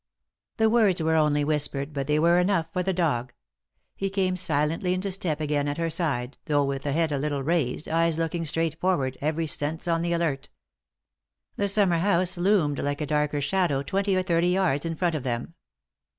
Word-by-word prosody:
The 220 Hz, -1 st, +3 dB
words 215 Hz, -5 st, +3 dB
were 160 Hz, 0 st, +1 dB
only 150 Hz, -2 st, +2 dB
whispered, 145 Hz, -1 st, -2 dB
but 140 Hz, -2 st, -3 dB
they 150 Hz, 0 st, +2 dB
were 170 Hz, +3 st, +4 dB
enough 180 Hz, -2 st, +1 dB
for 180 Hz, -, 0 dB
the 190 Hz, +1 st, 0 dB
dog. 145 Hz, -9 st, -1 dB, 0.6 s
He 195 Hz, -, -2 dB
came 190 Hz, -2 st, 0 dB
silently 170 Hz, +1 st, 0 dB
into 190 Hz, +2 st, -2 dB
step 170 Hz, -5 st, -1 dB
again 145 Hz, -1 st, -1 dB
at 145 Hz, +1 st, -2 dB
her 165 Hz, -1 st, -1 dB
side, 140 Hz, -6 st, -2 dB
though 145 Hz, -2 st, +2 dB
with 140 Hz, 0 st, -3 dB
head 155 Hz, +2 st, 0 dB
a 140 Hz, -, -1 dB
little 145 Hz, -1 st, -2 dB
raised, 150 Hz, -3 st, -1 dB
eyes 165 Hz, 0 st, +1 dB
looking 165 Hz, +1 st, -2 dB
straight 165 Hz, 0 st, -1 dB
forward, 145 Hz, -8 st, 0 dB
every 155 Hz, +3 st, -1 dB
sense 155 Hz, +2 st, -2 dB
on 165 Hz, -1 st, +1 dB
the 170 Hz, 0 st, -1 dB
alert. 160 Hz, -5 st, -1 dB, 1.1 s
The 200 Hz, -, 0 dB
summer 195 Hz, -4 st, +2 dB
house 185 Hz, 0 st, +2 dB
loomed 175 Hz, -6 st, +1 dB
like 145 Hz, 0 st, -2 dB
a 150 Hz, -, -2 dB
darker 150 Hz, -1 st, 0 dB
shadow 145 Hz, -3 st, 0 dB
twenty 195 Hz, +6 st, 0 dB
or 185 Hz, -, +1 dB
thirty 170 Hz, -1 st, +1 dB
yards 180 Hz, -5 st, +1 dB
in 165 Hz, -, -3 dB
front 175 Hz, +1 st, 0 dB
of 155 Hz, -, -2 dB
them. 120 Hz, +4 st, -4 dB
165 Hz, 195 wpm, -26 LUFS, 145-180 Hz, 1.1 s, were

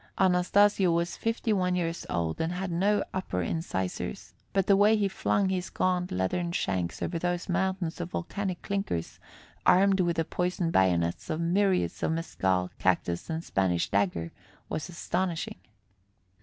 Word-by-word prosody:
Anastasio 190 Hz, +1 st, +4 dB
was 170 Hz, +1 st, 0 dB
fifty 225 Hz, 0 st, 0 dB
one 180 Hz, -2 st, +1 dB
years 170 Hz, -1 st, -2 dB
old 80 Hz, -2 st, -1 dB
and 165 Hz, +2 st, -1 dB
had 185 Hz, 0 st, -3 dB
no 200 Hz, +4 st, +2 dB
upper 140 Hz, -, -2 dB
incisors, 95 Hz, -, -3 dB, 0.2 s
but 195 Hz, -2 st, +2 dB
the 200 Hz, -, +5 dB
way 205 Hz, +2 st, +5 dB
he 205 Hz, -1 st, +2 dB
flung 195 Hz, 0 st, +1 dB
his 185 Hz, -1 st, -2 dB
gaunt 180 Hz, -1 st, 0 dB
leathern 130 Hz, -, -1 dB
shanks 90 Hz, -, -1 dB
over 170 Hz, -1 st, -2 dB
those 175 Hz, 0 st, -1 dB
mountains 185 Hz, -2 st, -1 dB
of 175 Hz, -, -4 dB
volcanic 185 Hz, +1 st, -3 dB
clinkers, 195 Hz, -, -3 dB, 0.4 s
armed 195 Hz, +1 st, +5 dB
with 175 Hz, -2 st, +2 dB
the 165 Hz, -1 st, 0 dB
poisoned 180 Hz, -1 st, -1 dB
bayonets 85 Hz, -3 st, +2 dB
of 155 Hz, -, -1 dB
myriads 185 Hz, +2 st, +1 dB
of 160 Hz, -, +1 dB
mescal, 95 Hz, -, 0 dB
cactus 85 Hz, -, 0 dB
and 160 Hz, 0 st, -2 dB
Spanish 90 Hz, -, 0 dB
dagger, 90 Hz, -5 st, 0 dB, 0.4 s
was 155 Hz, +3 st, -3 dB
astonishing. 175 Hz, -, -2 dB
175 Hz, 150 wpm, -28 LUFS, -, 0.4 s, the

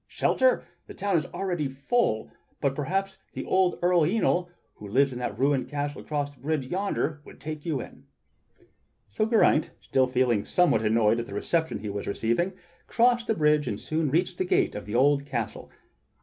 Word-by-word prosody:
Shelter? -, -, +2 dB, 0.2 s
The -, -, -10 dB
town 200 Hz, -1 st, 0 dB
is 160 Hz, -, +1 dB
already 175 Hz, -6 st, -2 dB
full, 135 Hz, -, 0 dB, 0.3 s
but 140 Hz, -1 st, +1 dB
perhaps 190 Hz, +7 st, -2 dB
the -, -, -5 dB
old 185 Hz, -2 st, +2 dB
Earl 175 Hz, -1 st, +4 dB
Yniol 175 Hz, 0 st, +1 dB, 0.2 s
who 105 Hz, -, -11 dB
lives 135 Hz, +6 st, +2 dB
in 125 Hz, -, -6 dB
that 125 Hz, -, -4 dB
ruined 135 Hz, -2 st, +1 dB
castle 145 Hz, 0 st, -3 dB
across 145 Hz, -2 st, -3 dB
the 130 Hz, -, -24 dB
bridge 150 Hz, -1 st, -1 dB
yonder 175 Hz, -2 st, -2 dB
would -, -, -14 dB
take 155 Hz, +1 st, -6 dB
you 150 Hz, -5 st, 0 dB
in." -, -, -10 dB, 1.0 s
So 215 Hz, -, 0 dB
Geraint, 220 Hz, -9 st, +3 dB
still 130 Hz, -1 st, +1 dB
feeling 125 Hz, -4 st, +1 dB
somewhat 180 Hz, -11 st, +2 dB
annoyed 110 Hz, +1 st, +3 dB
at 120 Hz, -, -4 dB
the 100 Hz, -, -7 dB
reception 160 Hz, +8 st, 0 dB
he 105 Hz, -, -4 dB
was 100 Hz, 0 st, -5 dB
receiving, 120 Hz, -, 0 dB, 0.3 s
crossed 240 Hz, 0 st, +2 dB
the 220 Hz, -, +1 dB
bridge 150 Hz, -1 st, +2 dB
and -, -, -3 dB
soon 155 Hz, -1 st, -1 dB
reached 175 Hz, +5 st, 0 dB
the -, -, +2 dB
gate -, -, +2 dB
of 105 Hz, -, -7 dB
the 105 Hz, -, -4 dB
old 140 Hz, +2 st, +4 dB
castle. 120 Hz, -5 st, -4 dB
150 Hz, 185 wpm, -27 LUFS, 125-180 Hz, 1.0 s, Earl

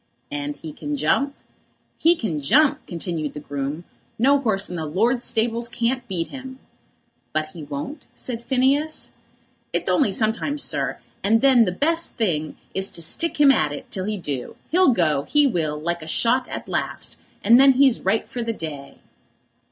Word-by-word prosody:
"And 145 Hz, 0 st, -4 dB
he 155 Hz, 0 st, -8 dB
can 295 Hz, -, -4 dB
jump?" 280 Hz, 0 st, +1 dB, 0.6 s
"He 335 Hz, +2 st, +5 dB
can 175 Hz, -, -3 dB
jump!" 285 Hz, -, +4 dB
continued 170 Hz, -3 st, -4 dB
the -, -, -6 dB
groom; 145 Hz, +2 st, -4 dB, 0.3 s
"no 275 Hz, +4 st, +4 dB
'orse 200 Hz, -6 st, +1 dB
in 180 Hz, -, -6 dB
my -, -, -3 dB
lord's 225 Hz, -, 0 dB
stables 230 Hz, +1 st, 0 dB
can't 240 Hz, +1 st, -1 dB
beat 175 Hz, -4 st, -2 dB
him." 260 Hz, -1 st, -8 dB, 0.8 s
"But 155 Hz, 0 st, -1 dB
he 160 Hz, +1 st, -10 dB
won't?" 150 Hz, -, -6 dB
said 235 Hz, -2 st, -5 dB
Phineas. 275 Hz, +5 st, +1 dB, 0.6 s
"It's -, -, -1 dB
only 270 Hz, -9 st, +3 dB
sometimes, 230 Hz, +8 st, 0 dB
sir, -, -, -1 dB, 0.3 s
and 225 Hz, +3 st, +3 dB
then 260 Hz, -4 st, +6 dB
the 180 Hz, -, 0 dB
best 330 Hz, -, 0 dB
thing 155 Hz, -9 st, -1 dB, 0.2 s
is 190 Hz, +1 st, +1 dB
to 170 Hz, -, -4 dB
stick 330 Hz, -, 0 dB
him 285 Hz, -2 st, +7 dB
at 155 Hz, -, +2 dB
it 145 Hz, -, -8 dB
till 185 Hz, -1 st, -3 dB
he 210 Hz, 0 st, -2 dB
do. 140 Hz, -8 st, -5 dB, 0.2 s
He'll 365 Hz, -3 st, +5 dB
go, 165 Hz, -, +2 dB
he 295 Hz, -1 st, +4 dB
will, 160 Hz, -, 0 dB
like 170 Hz, +2 st, -2 dB
a 155 Hz, -, -9 dB
shot 240 Hz, +9 st, +2 dB
at -, -, -6 dB
last; -, -, -3 dB, 0.3 s
and 230 Hz, +4 st, +7 dB
then 275 Hz, 0 st, +7 dB
he's 265 Hz, -2 st, +4 dB
right 195 Hz, +4 st, +1 dB
for 245 Hz, -, -5 dB
the 230 Hz, 0 st, -2 dB
day." 150 Hz, -7 st, -7 dB
220 Hz, 175 wpm, -23 LUFS, 160-265 Hz, 0.8 s, him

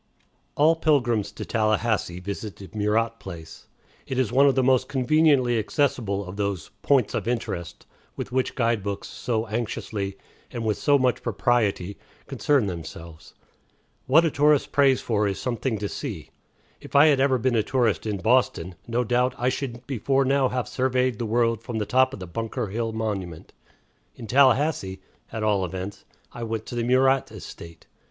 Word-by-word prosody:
All 155 Hz, +3 st, +4 dB
pilgrims 125 Hz, -10 st, +1 dB
to -, -, -6 dB
Tallahassee 110 Hz, -4 st, 0 dB
visit 100 Hz, +2 st, -6 dB
the 95 Hz, -, -12 dB
Murat 110 Hz, +2 st, 0 dB
place. 80 Hz, -4 st, -10 dB, 0.4 s
It 130 Hz, -, -3 dB
is 130 Hz, -5 st, +1 dB
one 140 Hz, +2 st, +5 dB
of 135 Hz, -, +3 dB
the 130 Hz, -, +2 dB
most 130 Hz, 0 st, +3 dB
conveniently 135 Hz, -3 st, +3 dB
accessible 110 Hz, -5 st, -1 dB
of 90 Hz, +2 st, -8 dB
those 100 Hz, -5 st, -3 dB
"points 135 Hz, -6 st, +2 dB
of -, -, -2 dB
interest" 110 Hz, -8 st, -4 dB, 0.3 s
with -, -, -6 dB
which 130 Hz, 0 st, -1 dB
guide 115 Hz, -3 st, +1 dB
books 100 Hz, 0 st, -4 dB
so 115 Hz, -2 st, -2 dB
anxiously, 105 Hz, -3 st, -3 dB, 0.3 s
and 115 Hz, -2 st, -5 dB
with 105 Hz, -2 st, 0 dB
so 140 Hz, +8 st, +4 dB
much 130 Hz, -2 st, +1 dB
propriety, 105 Hz, -4 st, 0 dB, 0.3 s
concern 140 Hz, -6 st, +1 dB
themselves. 85 Hz, -2 st, -8 dB, 0.7 s
What 160 Hz, +6 st, +5 dB
a 160 Hz, -, +1 dB
tourist 145 Hz, 0 st, +3 dB
prays 135 Hz, -2 st, +4 dB
for 105 Hz, -3 st, 0 dB
is 100 Hz, -1 st, -3 dB
something 125 Hz, -1 st, -2 dB
to 105 Hz, 0 st, -3 dB
see. 100 Hz, -, -6 dB, 0.5 s
If -, -, -12 dB
I 140 Hz, +2 st, +8 dB
had 145 Hz, -3 st, +4 dB
ever 135 Hz, -1 st, +3 dB
been 125 Hz, +1 st, 0 dB
a 110 Hz, -, +4 dB
tourist 115 Hz, -2 st, 0 dB
in 105 Hz, -2 st, -1 dB
Boston, 110 Hz, -5 st, +1 dB
no 120 Hz, +1 st, 0 dB
doubt 125 Hz, +2 st, +1 dB
I 125 Hz, +1 st, +1 dB
should 125 Hz, -2 st, -5 dB
before 135 Hz, +1 st, 0 dB
now 135 Hz, -1 st, +2 dB
have 125 Hz, -3 st, -2 dB
surveyed 130 Hz, -2 st, 0 dB
the 115 Hz, -, -2 dB
world 115 Hz, 0 st, +1 dB
from 115 Hz, 0 st, -5 dB
the 105 Hz, -, -1 dB
top 130 Hz, +3 st, +3 dB
of 135 Hz, -, -8 dB
the 95 Hz, -, -6 dB
Bunker 115 Hz, +5 st, -4 dB
Hill 115 Hz, +2 st, -2 dB
monument. 100 Hz, -7 st, -4 dB, 0.6 s
In 120 Hz, -, -9 dB
Tallahassee, 130 Hz, -5 st, +2 dB, 0.3 s
at 110 Hz, -1 st, -4 dB
all 105 Hz, -3 st, +2 dB
events, 95 Hz, +2 st, -6 dB, 0.3 s
I 120 Hz, -, -8 dB
went 115 Hz, -1 st, -3 dB
to -, -, -7 dB
the 120 Hz, -, -1 dB
Murat 130 Hz, +2 st, +3 dB
estate. 85 Hz, -1 st, -11 dB
115 Hz, 175 wpm, -25 LUFS, 105-130 Hz, 0.7 s, I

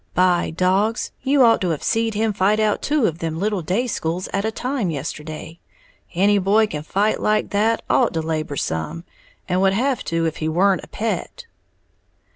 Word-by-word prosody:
"By 180 Hz, -1 st, +3 dB
dogs, 190 Hz, +7 st, 0 dB
you 275 Hz, 0 st, +3 dB
ought 230 Hz, -1 st, +5 dB
to 185 Hz, -, 0 dB
have 160 Hz, -3 st, -2 dB
seed 225 Hz, -1 st, 0 dB
him 220 Hz, 0 st, +1 dB
fight 200 Hz, +2 st, +2 dB
out 215 Hz, -1 st, +1 dB
two 290 Hz, -4 st, +1 dB
of 165 Hz, -3 st, -1 dB
them 160 Hz, -2 st, -3 dB
little 205 Hz, -1 st, 0 dB
day 190 Hz, +10 st, 0 dB
schools 180 Hz, -6 st, -3 dB
at 200 Hz, -, 0 dB
a 220 Hz, -, 0 dB
time 245 Hz, -3 st, -2 dB
yesterday! 155 Hz, +2 st, -6 dB, 0.6 s
Any 200 Hz, +3 st, +4 dB
boy 205 Hz, +3 st, +3 dB
can 150 Hz, -8 st, -5 dB
fight 200 Hz, +7 st, 0 dB
like 215 Hz, 0 st, 0 dB
that 220 Hz, +3 st, +1 dB
ought 240 Hz, -8 st, +2 dB
to 160 Hz, -, 0 dB
labor 155 Hz, -2 st, -3 dB
some, 80 Hz, -, -3 dB, 0.4 s
and 185 Hz, 0 st, +1 dB
would 195 Hz, 0 st, +3 dB
have 255 Hz, +5 st, 0 dB
to 165 Hz, 0 st, 0 dB
if 160 Hz, -1 st, -2 dB
he 155 Hz, -, -2 dB
weren't 185 Hz, +4 st, +2 dB
a -, -, -11 dB
pet!" 225 Hz, 0 st, -4 dB
195 Hz, 190 wpm, -21 LUFS, 165-220 Hz, 0.6 s, ought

